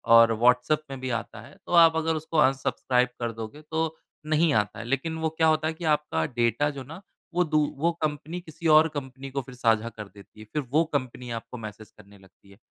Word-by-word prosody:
और 115 0 +7
व्हॉट्सऐप 125 +7 +3
में 135 -1 -6
भी 130 0 -4
आता 115 -1 -9
है, 115 - -14
तो - - -9
आप 165 -1 +7
अगर 160 0 0
उसको 160 +1 -4
अनसब्सक्राइब 130 -2 +2
कर 120 -1 -2
दोगे, 115 +7 -8
तो 160 +1 -2 0.3
नहीं 155 +1 +2
आता 105 0 0
है। 115 - -6
लेकिन 135 +6 -2
वो 160 - 0
क्या 160 0 +1
होता 155 0 +2
है 160 - -1
कि 165 +1 -7
आपका 150 - +1
डेटा 120 - +1
जो 140 -2 -7
ना, 160 +8 -10 0.3
वो 180 +1 +3
दू 155 -2 +1 0.2
वो 165 +4 +2
कंपनी 155 +3 -3
किसी 165 0 -5
और 155 +1 +7
कंपनी 135 -1 -6
को 140 - -2
फिर 130 0 -12
साझा 115 -2 +1
कर 105 -2 -9
देती 100 +2 -17
है, 110 - -10
फिर 150 - 0
वो 155 +4 +3
कंपनी 125 -2 -3
आपको 115 +2 -6
मैसेज 110 -1 -9
करने 100 -1 -17
लगती 95 +1 -22
है। 100 - -17
135 Hz, 225 wpm, -26 LUFS, 115-155 Hz, 0.3 s, और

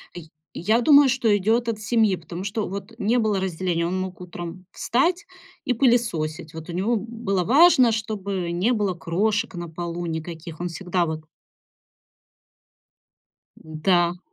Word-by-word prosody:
Е 175 - -6 0.3
я 220 +7 +1
думаю, 285 +1 +7
что 255 -3 0
идёт 230 +4 +1
от 215 -2 -3
семьи, 220 -3 +2
потому 170 +2 -8
что 205 +2 -2
вот 200 +3 -7
не 235 +3 +1
было 210 -3 +1
разделения. 175 -2 -1
Он 185 +2 -1
мог 185 -1 -5
утром 175 0 -8
встать 335 +10 0 0.4
и 250 - 0
пылесосить. 180 - 0
Вот 160 +2 -8
у - - -5
него, 200 +7 0
м, 210 +1 -3
было 205 -6 -1
важно, 260 - +6
чтобы 200 -5 -3
не 190 +9 +1
было 205 -5 0
крошек 205 +7 -1
на 175 -1 -6
полу 170 +1 -5
никаких. 160 0 -6
Он 175 - -2
всегда 180 0 -1
вот 160 -1 -4 2.3
Да. 175 +2 0
190 Hz, 150 wpm, -24 LUFS, 175-225 Hz, 2.3 s, думаю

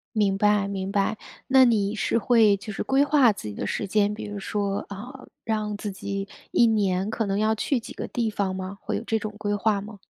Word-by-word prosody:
明 200 -2 +2
白 210 -1 +3
明 195 -1 -3
白， 205 +1 +1 0.3
那 265 -1 +6
你 210 -4 +2
是 230 - 0
会 220 -3 +4
就 210 +2 -8
是 - - -4
规 270 +1 +3
划 280 -6 +5
自 200 - -8
己 105 - -5
的 - - -4
时 200 - -2
间， 205 +1 +2
比 215 - -6
如 205 -1 -6
说， 200 0 -2
呃， 250 +7 -9 0.2
让 215 -2 -2
自 205 -1 -4
己 195 +1 -4 0.2
1 240 - +5
年 200 -3 +1
可 220 0 -1
能 195 0 -1
要 215 +1 +2
去 250 +4 0
几 225 - -10
个 - - -5
地 235 -2 -1
方 200 -3 -2
吗？ 190 +1 -6
会 - - -3
有 - - -5
这 225 - 0
种 210 0 -6
规 205 -1 -2
划 205 0 +1
吗？ 210 0 -10
210 Hz, 245 characters per minute, -25 LUFS, 200-220 Hz, 0.3 s, 那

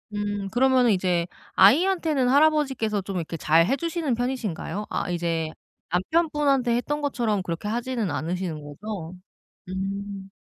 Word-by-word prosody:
음 205 -1 -2
그러면은 255 -1 +4
이제 180 -2 +1 0.3
아이한테는 305 - +4
할아버지께서 270 -8 +3
좀 190 0 -5
이렇게 165 0 -4
잘 165 +1 +4
해주시는 305 - -1
편이신가요? 225 -5 -3
아 - - -2
이제 165 -2 -1 0.4
남편분한테 275 - +1
했던 295 +4 -2
것처럼 235 -8 0
그렇게 175 +3 -4
하지는 235 -2 -2
않으시는 170 -1 -3
거죠? 180 +3 -7 0.5
음. 195 +1 -5
210 Hz, 335 characters per minute, -25 LUFS, 180-265 Hz, 0.5 s, 그러면은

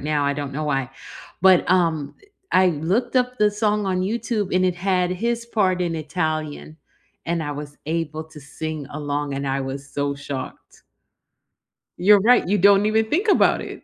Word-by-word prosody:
now, 145 0 0
I 140 - +1
don't 140 -1 -5
know 150 +3 -3
why, 135 -3 -1 0.5
but, 190 -1 +5
um, 165 -5 +1
eh, - - -21 0.3
I 185 0 +6
looked 180 - -1
up 250 0 +1
the 210 0 +4
song 210 -1 0
on 185 -1 0
YouTube, 210 -1 -2
and 185 0 +3
it 180 -1 0
had 180 -1 0
his 235 +5 -2
part 190 -6 +1
in 170 -2 -1
Italian, 155 -1 -3 0.5
and 170 -1 -1
I 145 - -4
was 145 0 -8
able 160 -1 -2
to 155 -1 -14
sing 150 +1 -6
along, 145 -1 -3
and 140 0 -3
I 135 +1 -1
was 135 +1 -6
so 140 0 -2
shocked. 140 -2 -8 1.2
You're 200 +2 +5
right, 245 +1 +4
you 205 +3 +2
don't 200 +2 +5
even 220 +1 +1
think 380 +8 0
about 400 - +4
it. - - -9
170 Hz, 180 wpm, -22 LUFS, 145-205 Hz, 1.2 s, I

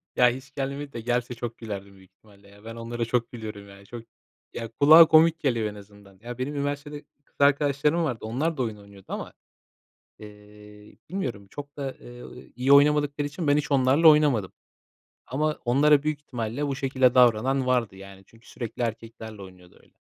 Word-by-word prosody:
Ya, 125 -1 +5
hiç 130 +3 -8
gelmedi 140 +1 -5
de 115 - -6
gelse 120 +1 -2
çok 115 0 -6
gülerdim 100 -3 -8
büyük 95 -1 -20
ihtimalle, 100 +1 -22
ya. 100 +1 -19
Ben 115 - -8
onlara 115 0 -4
çok 120 0 -1
gülüyorum, 105 -4 -9
ya 100 0 -15
çok. 120 +2 -9 0.5
Ya, 115 - -5
kulağa 155 +8 +7
komik 160 +1 +5
geliyor 115 -6 0
en 105 - -7
azından. 100 -1 -16
Ya, 120 +1 -8
benim 140 +3 -4
üniversitede 145 +1 -4 0.2
kız - - -37
arkadaşlarım 145 +3 +2
vardı 125 -7 -2
onlar 150 +9 -2
da 130 - 0
oyun 110 -3 -4
oynuyordu 100 -1 -16
ama, 205 +4 -6 0.9
eee, 105 0 -15
bilmiyorum 125 - -5
çok 145 +3 -10
da, 135 -2 -4
eee, 120 0 -12 0.3
iyi 125 +3 0
oynamadıkları 145 0 +4
için 155 +2 -5
ben 145 0 +4
hiç 150 - -3
onlarla 140 +4 +4
oynamadım. 145 -11 +4 0.8
Ama 150 +4 -2
onlara 140 +4 +4
büyük 155 -1 -2
ihtimalle 125 +1 -4
bu 140 - -2
şekilde 130 -2 +1
davranan 125 +2 +3
vardı, 125 -6 0
yani. 95 0 -13
Çünkü 115 +1 -22
sürekli 120 -1 -7
erkeklerle 110 -2 -6
oynuyordu 90 -2 -15
öyle. - - -27
125 Hz, 175 wpm, -25 LUFS, 105-145 Hz, 0.9 s, kulağa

